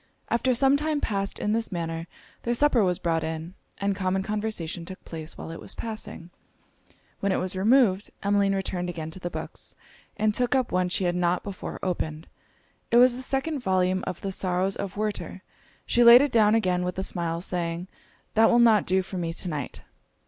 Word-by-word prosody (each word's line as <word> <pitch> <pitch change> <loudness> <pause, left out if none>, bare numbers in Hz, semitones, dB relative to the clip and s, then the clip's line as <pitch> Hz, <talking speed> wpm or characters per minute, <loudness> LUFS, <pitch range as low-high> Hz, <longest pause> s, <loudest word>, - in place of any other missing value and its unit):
After 245 +2 +2
some 270 +3 +4
time 300 0 -1
passed 195 -6 -2
in 210 - -1
this 225 0 -1
manner, 165 -1 -4 0.3
their 240 0 -1
supper 255 -4 +4
was 180 -2 +1
brought 165 -1 0
in, 160 +2 -5 0.2
and 200 0 0
common 190 0 0
conversation 205 -5 -3
took 185 +2 -10
place 160 -1 -7
while - - -7
it 165 - -7
was - - -7
passing. 215 -6 -6 0.9
When 200 - 0
it - - +2
was 185 0 0
removed, 205 -1 +3
Emmeline 200 -1 +2
returned 180 -2 -2
again 160 -2 -5
to 185 - -10
the 175 - -4
books, - - -7 0.4
and 215 0 +2
took 250 +4 +1
up 260 -2 +1
one 180 0 +1
she 180 - -1
had 175 -1 +1
not 180 0 +1
before 200 -2 -6
opened. 160 -3 -3 0.6
It 235 - +4
was 250 0 +6
the 255 - -5
second 275 +3 -1
volume 185 -4 +1
of 185 -2 -4
the 195 - -3
Sorrows 185 +1 0
of 200 0 -5
Werter. 215 0 -3 0.4
She 240 - +3
laid 240 +3 +10
it 285 - 0
down 215 -1 +5
again 180 -5 +1
with 180 0 -3
a 190 - -1
smile, 170 -3 -2
saying 175 0 -3 0.5
'That 225 +1 +5
will 240 - +4
not 225 -4 +5
do 190 +1 +2
for 185 0 -6
me 165 -1 -2
to 180 - -5
night.' 140 - -5
190 Hz, 200 wpm, -26 LUFS, 175-225 Hz, 0.9 s, laid